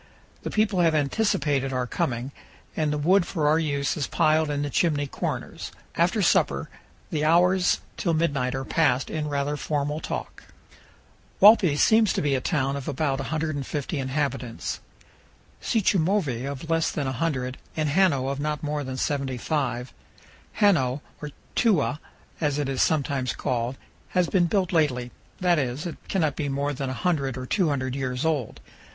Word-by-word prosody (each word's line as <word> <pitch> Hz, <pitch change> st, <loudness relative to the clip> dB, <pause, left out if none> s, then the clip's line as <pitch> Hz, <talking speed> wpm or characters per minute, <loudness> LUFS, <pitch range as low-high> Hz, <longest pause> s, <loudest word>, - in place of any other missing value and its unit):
The -, -, -4 dB
people 210 Hz, -3 st, +1 dB
have 165 Hz, -2 st, +4 dB
anticipated 145 Hz, -4 st, +1 dB
our 125 Hz, -1 st, -1 dB
coming, 120 Hz, +1 st, -2 dB, 0.4 s
and 155 Hz, -2 st, 0 dB
the 150 Hz, -, 0 dB
wood 180 Hz, +6 st, +4 dB
for 160 Hz, -4 st, -1 dB
our 155 Hz, +2 st, +4 dB
use 140 Hz, -3 st, 0 dB
is 145 Hz, -5 st, -2 dB
piled 155 Hz, -1 st, +2 dB
in 145 Hz, 0 st, -1 dB
the 145 Hz, -, -2 dB
chimney 150 Hz, -3 st, +1 dB
corners. 135 Hz, -, -4 dB, 0.2 s
After -, -, +2 dB
supper -, -, +2 dB, 0.4 s
the 150 Hz, -1 st, -1 dB
hours 180 Hz, +3 st, +3 dB, 0.2 s
till 170 Hz, -3 st, 0 dB
midnight 140 Hz, -6 st, 0 dB
are 135 Hz, 0 st, -3 dB
passed 140 Hz, -5 st, +1 dB
in 155 Hz, -1 st, -2 dB
rather 145 Hz, 0 st, -1 dB
formal 150 Hz, +1 st, -2 dB
talk. -, -, -5 dB, 1.0 s
Walpi 195 Hz, -8 st, +7 dB
seems 220 Hz, +3 st, +4 dB
to -, -, -1 dB
be 145 Hz, -1 st, +1 dB
a 130 Hz, -, +1 dB
town 135 Hz, -1 st, 0 dB
of 140 Hz, -2 st, -6 dB
about 140 Hz, -1 st, -1 dB
150 150 Hz, 0 st, -3 dB
inhabitants, 135 Hz, -3 st, -2 dB, 0.8 s
Sichumovi 185 Hz, -, +1 dB
of 140 Hz, +3 st, -6 dB
less 165 Hz, 0 st, +1 dB
than 145 Hz, -, -2 dB
100, 130 Hz, -1 st, -2 dB, 0.2 s
and 155 Hz, -1 st, +1 dB
Hano 145 Hz, -5 st, +3 dB
of 140 Hz, -, -4 dB
not 150 Hz, +1 st, -2 dB
more 150 Hz, 0 st, -2 dB
than 130 Hz, -1 st, -5 dB
75. 130 Hz, -2 st, -2 dB, 0.7 s
Hano, 145 Hz, -10 st, +3 dB, 0.2 s
or 150 Hz, -, -5 dB, 0.3 s
"Tewa" 175 Hz, -, +2 dB, 0.4 s
as 145 Hz, -2 st, +1 dB
it 145 Hz, -2 st, -1 dB
is 135 Hz, -1 st, -1 dB
sometimes 140 Hz, -5 st, +1 dB
called, 125 Hz, 0 st, -2 dB, 0.4 s
has 180 Hz, -1 st, +4 dB
been 175 Hz, -1 st, +2 dB
built 190 Hz, 0 st, 0 dB
lately; 125 Hz, -7 st, +1 dB, 0.3 s
that 175 Hz, -3 st, +3 dB
is, 130 Hz, +3 st, -2 dB
it 170 Hz, -, -5 dB
cannot 155 Hz, -7 st, +1 dB
be 145 Hz, -3 st, -2 dB
more 140 Hz, +1 st, -1 dB
than 135 Hz, 0 st, -3 dB
100 135 Hz, -1 st, -1 dB
or 130 Hz, -, -5 dB
200 135 Hz, -6 st, 0 dB
years 130 Hz, 0 st, -2 dB
old. 150 Hz, -8 st, -1 dB
145 Hz, 160 wpm, -25 LUFS, 135-165 Hz, 1.0 s, Walpi